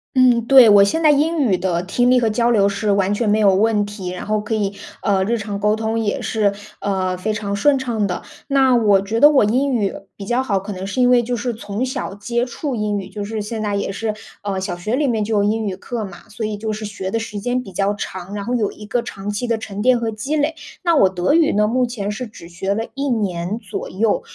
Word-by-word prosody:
嗯， 245 Hz, -3 st, +4 dB
对， 255 Hz, -2 st, +8 dB
我 205 Hz, -1 st, +8 dB
现 260 Hz, +12 st, +1 dB
在 310 Hz, -, +5 dB
英 310 Hz, +3 st, +2 dB
语 225 Hz, -10 st, +2 dB
的 175 Hz, -1 st, -1 dB
听 245 Hz, +7 st, +2 dB
力 255 Hz, -, +5 dB
和 230 Hz, -2 st, +1 dB
交 235 Hz, +2 st, +2 dB
流 200 Hz, -4 st, +4 dB
是 200 Hz, +1 st, -1 dB
完 200 Hz, 0 st, +2 dB
全 215 Hz, +1 st, 0 dB
没 210 Hz, +1 st, +3 dB
有 200 Hz, -3 st, +5 dB
问 210 Hz, +1 st, +2 dB
题， 205 Hz, -3 st, -6 dB
然 180 Hz, 0 st, -6 dB
后 215 Hz, 0 st, 0 dB
可 210 Hz, +2 st, -4 dB
以， 205 Hz, -2 st, -1 dB, 0.3 s
呃， 195 Hz, -2 st, +2 dB
日 230 Hz, +4 st, 0 dB
常 205 Hz, -1 st, -4 dB
沟 210 Hz, +1 st, +2 dB
通 220 Hz, 0 st, -1 dB
也 205 Hz, -2 st, -1 dB
是， 210 Hz, -2 st, +1 dB, 0.3 s
呃， 190 Hz, -2 st, -1 dB
非 215 Hz, +4 st, -2 dB
常 205 Hz, -1 st, -3 dB
顺 275 Hz, +6 st, +3 dB
畅 235 Hz, -5 st, -1 dB
的。 180 Hz, -, -3 dB, 0.3 s
那 270 Hz, -2 st, +4 dB
我 205 Hz, -5 st, +4 dB
觉 220 Hz, +4 st, -2 dB
得 295 Hz, -, +9 dB
我 280 Hz, -7 st, +4 dB
英 260 Hz, +6 st, +1 dB
语 205 Hz, -5 st, 0 dB, 0.2 s
比 200 Hz, -, -7 dB
较 245 Hz, +5 st, 0 dB
好， 200 Hz, -7 st, 0 dB
可 200 Hz, +2 st, -6 dB
能 185 Hz, 0 st, -6 dB
是 200 Hz, +6 st, -4 dB
因 250 Hz, -1 st, +5 dB
为 245 Hz, -1 st, +5 dB
就 245 Hz, +1 st, -2 dB
是 240 Hz, +1 st, -2 dB
从 215 Hz, +2 st, -3 dB
小 255 Hz, -5 st, -4 dB
接 235 Hz, +4 st, -2 dB
触 260 Hz, +2 st, -4 dB
英 210 Hz, -2 st, -1 dB
语， 195 Hz, -, -7 dB
就 205 Hz, -, -6 dB
是 215 Hz, +1 st, -4 dB
现 215 Hz, +1 st, -4 dB
在 205 Hz, -1 st, -1 dB
也 200 Hz, -, -2 dB
是， 215 Hz, +2 st, -2 dB, 0.3 s
呃， 200 Hz, -2 st, -2 dB
小 185 Hz, -1 st, -3 dB
学 215 Hz, +8 st, -2 dB
里 295 Hz, 0 st, +1 dB
面 225 Hz, -4 st, 0 dB
就 220 Hz, +1 st, -1 dB
有 200 Hz, -, +3 dB
英 220 Hz, +1 st, 0 dB
语 190 Hz, -2 st, -3 dB
课 230 Hz, +3 st, -5 dB
嘛， 190 Hz, -4 st, -10 dB
所 215 Hz, +1 st, -5 dB
以 215 Hz, -1 st, -3 dB
就 215 Hz, +1 st, -3 dB
是 215 Hz, +1 st, -6 dB
学 205 Hz, -2 st, -5 dB
的 225 Hz, -, -1 dB
时 220 Hz, -2 st, -5 dB
间 245 Hz, +4 st, -1 dB
比 195 Hz, -, -11 dB
较 195 Hz, +2 st, 0 dB
长， 190 Hz, -1 st, -6 dB
然 205 Hz, -1 st, -4 dB
后 240 Hz, -, -3 dB
有 220 Hz, -4 st, +1 dB
一 210 Hz, -, -11 dB
个 235 Hz, +4 st, -1 dB
长 205 Hz, -4 st, -7 dB
期 210 Hz, +4 st, -2 dB
的 230 Hz, -1 st, +1 dB
沉 205 Hz, -2 st, -6 dB
淀 255 Hz, +1 st, +4 dB
和 230 Hz, -1 st, -2 dB
积 225 Hz, +8 st, -3 dB
累。 305 Hz, +1 st, 0 dB, 0.3 s
那 340 Hz, -2 st, +3 dB
我 195 Hz, -, +6 dB
德 185 Hz, +6 st, 0 dB
语 325 Hz, -1 st, +4 dB
呢， 210 Hz, +1 st, +2 dB
目 250 Hz, +2 st, +2 dB
前 215 Hz, -4 st, -4 dB
是 240 Hz, +4 st, -5 dB
只 170 Hz, -6 st, -13 dB
学 190 Hz, +3 st, -2 dB
了 220 Hz, +2 st, -2 dB
1 280 Hz, +1 st, -2 dB
年 200 Hz, -4 st, -1 dB
左 205 Hz, -5 st, -6 dB
右， 210 Hz, +3 st, +1 dB
215 Hz, 285 characters per minute, -20 LUFS, 200-240 Hz, 0.3 s, 得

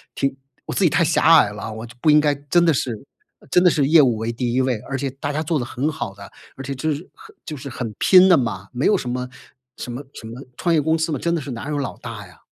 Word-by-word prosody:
挺 135 Hz, -1 st, -1 dB, 0.3 s
我 -, -, -5 dB
自 -, -, 0 dB
己 -, -, +6 dB
太 170 Hz, -, +2 dB
狭 165 Hz, -, +1 dB, 0.2 s
隘 105 Hz, -, +3 dB
了， 110 Hz, +1 st, -6 dB
我 110 Hz, +2 st, -7 dB
就 120 Hz, -, -14 dB
不 155 Hz, -, +3 dB
应 150 Hz, -, +7 dB
该 145 Hz, -1 st, +2 dB
真 145 Hz, +5 st, +1 dB
的 165 Hz, -, +4 dB
是 125 Hz, -3 st, -3 dB, 0.5 s
真 180 Hz, -, +4 dB
的 -, -, +7 dB
是 145 Hz, -4 st, +1 dB
业 160 Hz, 0 st, +7 dB
务 125 Hz, -6 st, +3 dB
为 115 Hz, +2 st, -3 dB
第 120 Hz, 0 st, -2 dB
1 130 Hz, -, +2 dB
位， 125 Hz, -4 st, 0 dB
而 135 Hz, -, -2 dB
且 135 Hz, 0 st, -3 dB
大 140 Hz, +2 st, -5 dB
家 155 Hz, +2 st, -1 dB
做 160 Hz, 0 st, -1 dB
得 120 Hz, -, -2 dB
很 130 Hz, +5 st, -2 dB
好 100 Hz, -8 st, -5 dB
的， 100 Hz, -1 st, -12 dB, 0.3 s
而 135 Hz, -, -7 dB
且 140 Hz, -, -4 dB
就 155 Hz, +4 st, -1 dB
是 155 Hz, +6 st, -9 dB
很 435 Hz, -1 st, -16 dB
就 155 Hz, -, -6 dB
是 140 Hz, +1 st, -8 dB
很 120 Hz, -3 st, -5 dB
拼 185 Hz, 0 st, +6 dB
的 180 Hz, -, +7 dB
嘛， 100 Hz, -6 st, -3 dB
没 125 Hz, +2 st, -1 dB
有 -, -, +4 dB
什 125 Hz, -, -4 dB
么 125 Hz, 0 st, -3 dB, 0.5 s
什 125 Hz, -, -7 dB
么 130 Hz, +4 st, -6 dB
什 110 Hz, -, -10 dB
么 120 Hz, +3 st, -9 dB, 0.2 s
创 170 Hz, -, 0 dB
业 155 Hz, -, +4 dB
公 160 Hz, +2 st, +1 dB
司 160 Hz, 0 st, -1 dB
嘛， 140 Hz, -, -1 dB
真 170 Hz, 0 st, -1 dB
的 165 Hz, -, -1 dB
是 140 Hz, -, -7 dB
哪 125 Hz, +4 st, -6 dB
有 150 Hz, -1 st, -2 dB
老 135 Hz, -3 st, -4 dB
大 -, -, -8 dB
呀。 -, -, -21 dB
140 Hz, 310 characters per minute, -21 LUFS, 120-160 Hz, 0.5 s, 应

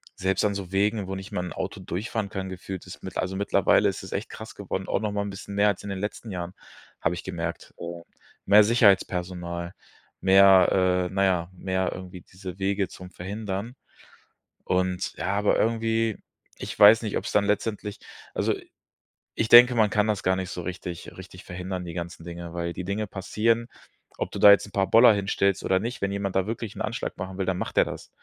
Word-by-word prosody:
selbst 95 Hz, +1 st, 0 dB
an 100 Hz, -, +1 dB
so 95 Hz, -2 st, -6 dB
Wegen, 100 Hz, 0 st, +1 dB
wo 95 Hz, -, -4 dB
nicht 95 Hz, +1 st, -8 dB
mal 90 Hz, -, -2 dB
'n 90 Hz, -, -6 dB
Auto -, -, -5 dB
durchfahren 100 Hz, +3 st, -3 dB
kann, 95 Hz, -2 st, -5 dB
gefühlt, 95 Hz, 0 st, -7 dB
ist 90 Hz, -, -11 dB
mit 95 Hz, -, -6 dB
also, 95 Hz, +1 st, -2 dB
mittlerweile 100 Hz, -, +3 dB
ist -, -, -6 dB
es -, -, -9 dB
echt -, -, -3 dB
krass 110 Hz, 0 st, -9 dB
geworden, 95 Hz, -1 st, -4 dB
auch -, -, 0 dB
nochmal 105 Hz, -1 st, -1 dB
'n 100 Hz, -, -4 dB
bisschen 100 Hz, +1 st, -8 dB
mehr 105 Hz, +1 st, +4 dB
als 100 Hz, -, -3 dB
in 100 Hz, -, -6 dB
den 95 Hz, -1 st, -4 dB
letzten 105 Hz, +2 st, -5 dB
Jahren, 90 Hz, 0 st, -5 dB, 0.5 s
habe 85 Hz, +2 st, 0 dB
ich -, -, -7 dB
gemerkt. 85 Hz, -1 st, -5 dB
Äh, 85 Hz, 0 st, -6 dB, 0.4 s
mehr 105 Hz, +2 st, +7 dB
Sicherheitspersonal, 90 Hz, -6 st, +1 dB, 0.5 s
mehr 95 Hz, -1 st, +5 dB
äh, -, -, -10 dB
naja, 95 Hz, -3 st, +1 dB
mehr, 95 Hz, 0 st, -1 dB
irgendwie 90 Hz, -1 st, -9 dB
diese 95 Hz, 0 st, -10 dB
Wege 100 Hz, 0 st, 0 dB
zum 90 Hz, 0 st, -11 dB
Verhindern. 100 Hz, +4 st, -5 dB, 0.9 s
Und 90 Hz, 0 st, 0 dB
ja, 80 Hz, -, -3 dB
aber 105 Hz, 0 st, +2 dB
irgendwie, 115 Hz, -1 st, +1 dB, 0.4 s
ich -, -, -7 dB
weiß 110 Hz, +3 st, +8 dB
nicht, 105 Hz, -, -3 dB
ob's -, -, -4 dB
dann 100 Hz, -1 st, +3 dB
letztendlich 105 Hz, 0 st, -2 dB, 0.3 s
also -, -, +1 dB, 0.8 s
ich 115 Hz, -, -1 dB
denke, 125 Hz, +1 st, +9 dB
man 110 Hz, -2 st, +4 dB
kann 105 Hz, +1 st, +1 dB
das 105 Hz, -4 st, -1 dB
gar 95 Hz, 0 st, +2 dB
nicht 95 Hz, -1 st, -4 dB
so 90 Hz, -, -5 dB
richtig 90 Hz, -1 st, -6 dB
richtig 90 Hz, -1 st, -11 dB
verhindern, 90 Hz, +1 st, -5 dB
die 85 Hz, -, -7 dB
ganzen 85 Hz, -1 st, -6 dB
Dinge, 85 Hz, -1 st, -7 dB
weil 85 Hz, 0 st, -3 dB
die 90 Hz, -, -6 dB
Dinge 105 Hz, +2 st, -2 dB
passieren, 115 Hz, +5 st, 0 dB, 0.5 s
ob -, -, -3 dB
du -, -, -5 dB
da 105 Hz, -, +9 dB
jetzt 100 Hz, 0 st, +4 dB
'n -, -, -15 dB
paar 95 Hz, -2 st, +1 dB
Boller 115 Hz, +3 st, +8 dB
hinstellst 100 Hz, -1 st, 0 dB
oder 95 Hz, 0 st, +3 dB
nicht. 120 Hz, +4 st, -5 dB
Wenn 100 Hz, 0 st, 0 dB
jemand 100 Hz, -1 st, -3 dB
da 95 Hz, +2 st, +1 dB
wirklich 115 Hz, -2 st, -5 dB
'n -, -, -5 dB
Anschlag 115 Hz, +2 st, -3 dB
machen 95 Hz, +1 st, -6 dB
will, 95 Hz, -, -1 dB
dann 95 Hz, -1 st, -1 dB
macht -, -, -4 dB
der -, -, +7 dB
das. -, -, -8 dB
95 Hz, 205 wpm, -26 LUFS, 90-105 Hz, 0.9 s, denke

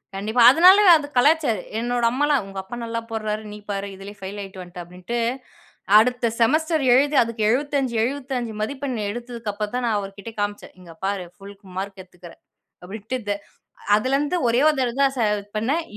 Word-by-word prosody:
கண்டிப்பா. 215 Hz, +5 st, 0 dB
அதனாலயே 370 Hz, +7 st, +7 dB
அது 290 Hz, -1 st, -6 dB
கலாய்ச்சாரு. 285 Hz, -2 st, +3 dB, 0.2 s
என்னோட 240 Hz, +1 st, -1 dB
அம்மாலாம், 285 Hz, 0 st, +1 dB
உங்க 195 Hz, 0 st, -10 dB
அப்பா 210 Hz, +6 st, -9 dB
நல்லா 230 Hz, 0 st, -3 dB
போட்றாரு. 215 Hz, -1 st, -3 dB
நீ 210 Hz, -, -8 dB
பாரு, 200 Hz, 0 st, -3 dB
இதிலேயே 200 Hz, +2 st, -11 dB
பெயில் 195 Hz, +2 st, -6 dB
அயுட்டு 195 Hz, -1 st, -9 dB
வண்ட 180 Hz, 0 st, -12 dB
அப்டிண்டு. 180 Hz, +7 st, -6 dB, 0.8 s
அடுத்த 245 Hz, +1 st, +2 dB
செமஸ்டர் 310 Hz, +5 st, +2 dB
எழுது 285 Hz, +3 st, +3 dB
அதுக்கு 230 Hz, -1 st, -4 dB
75 270 Hz, 0 st, 0 dB
75 255 Hz, -2 st, -3 dB
மதிப்பெண் 265 Hz, +1 st, -3 dB
எடுத்ததுக்கு 235 Hz, -1 st, -6 dB
அப்புறம் 210 Hz, +1 st, -4 dB
தான் 250 Hz, -1 st, -1 dB
நான் 215 Hz, -3 st, +1 dB
அவர்க்கிட்ட 200 Hz, +3 st, -8 dB
காமிச்சேன். 205 Hz, 0 st, -4 dB
இங்க 170 Hz, -2 st, -13 dB
பாரு 195 Hz, -2 st, -2 dB
புல் 200 Hz, +1 st, -13 dB
மார்க் 195 Hz, 0 st, -5 dB
எடுத்துக்றேன். 180 Hz, -2 st, -15 dB, 0.4 s
அப்டின்ட்டு, 215 Hz, +6 st, -5 dB
த 205 Hz, -, +2 dB, 0.6 s
அதுல 255 Hz, +6 st, +1 dB
இருந்து 295 Hz, +5 st, -1 dB
ஒரே 240 Hz, +3 st, +2 dB, 0.2 s
தரவ 245 Hz, -2 st, -1 dB
தான் 275 Hz, -1 st, +3 dB
ச 240 Hz, -, 0 dB, 0.4 s
பண்ணேன் 280 Hz, +10 st, 0 dB
230 Hz, 165 wpm, -22 LUFS, 200-265 Hz, 0.8 s, அதனாலயே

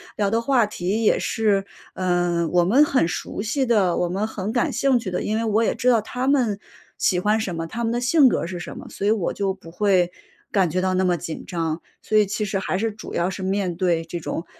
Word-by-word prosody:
聊 205 Hz, -2 st, +1 dB
的 230 Hz, -, +2 dB
话 240 Hz, -2 st, +3 dB
题 205 Hz, +2 st, -2 dB
也 -, -, +3 dB
是， 205 Hz, -3 st, +1 dB, 0.3 s
嗯， 175 Hz, -2 st, 0 dB
我 175 Hz, -, +5 dB
们 250 Hz, +12 st, +5 dB
很 265 Hz, -, +2 dB
熟 175 Hz, -, -4 dB
悉 260 Hz, +6 st, 0 dB
的、 200 Hz, -7 st, +2 dB
我 180 Hz, -, +1 dB
们 195 Hz, +4 st, -1 dB
很 210 Hz, -1 st, -4 dB
感 245 Hz, -, +1 dB
兴 270 Hz, -2 st, +2 dB
趣 220 Hz, -6 st, -4 dB
的， 180 Hz, -, -2 dB
因 215 Hz, -, -1 dB
为 225 Hz, -, 0 dB
我 220 Hz, 0 st, +2 dB
也 -, -, +1 dB
知 250 Hz, -, +1 dB
道 235 Hz, -2 st, +5 dB
他 250 Hz, +4 st, -4 dB
们 245 Hz, -8 st, +2 dB, 0.4 s
喜 180 Hz, -, +2 dB
欢 210 Hz, +4 st, +2 dB
什 195 Hz, -5 st, -3 dB
么， 165 Hz, 0 st, -4 dB
他 235 Hz, +6 st, -4 dB
们 225 Hz, -, 0 dB
的 240 Hz, -, 0 dB
性 270 Hz, +3 st, +5 dB
格 -, -, 0 dB
儿 -, -, -3 dB
是 175 Hz, -1 st, -5 dB
什 -, -, -7 dB
么， -, -, -9 dB
所 200 Hz, -, -5 dB
以 210 Hz, -, +4 dB
我 210 Hz, -6 st, 0 dB
就 195 Hz, -1 st, -1 dB
不 185 Hz, -3 st, -14 dB
会 180 Hz, -1 st, +2 dB, 0.4 s
感 190 Hz, -4 st, +2 dB
觉 185 Hz, +4 st, -1 dB
到 185 Hz, 0 st, 0 dB
那 185 Hz, -, +2 dB
么 180 Hz, -1 st, +2 dB
紧 165 Hz, -2 st, -6 dB
张， 165 Hz, -2 st, -3 dB, 0.2 s
所 215 Hz, -, +1 dB
以 210 Hz, -, +5 dB
其 205 Hz, +2 st, -3 dB
实 195 Hz, -1 st, -2 dB
还 190 Hz, -, -2 dB
是， 225 Hz, +3 st, -1 dB
主 215 Hz, -, -10 dB
要 170 Hz, +2 st, 0 dB
是 190 Hz, 0 st, -6 dB
面 190 Hz, -2 st, -1 dB
对 170 Hz, -2 st, +1 dB
这 170 Hz, +1 st, -5 dB
种， 165 Hz, +1 st, -4 dB
195 Hz, 275 characters per minute, -23 LUFS, 180-225 Hz, 0.4 s, 我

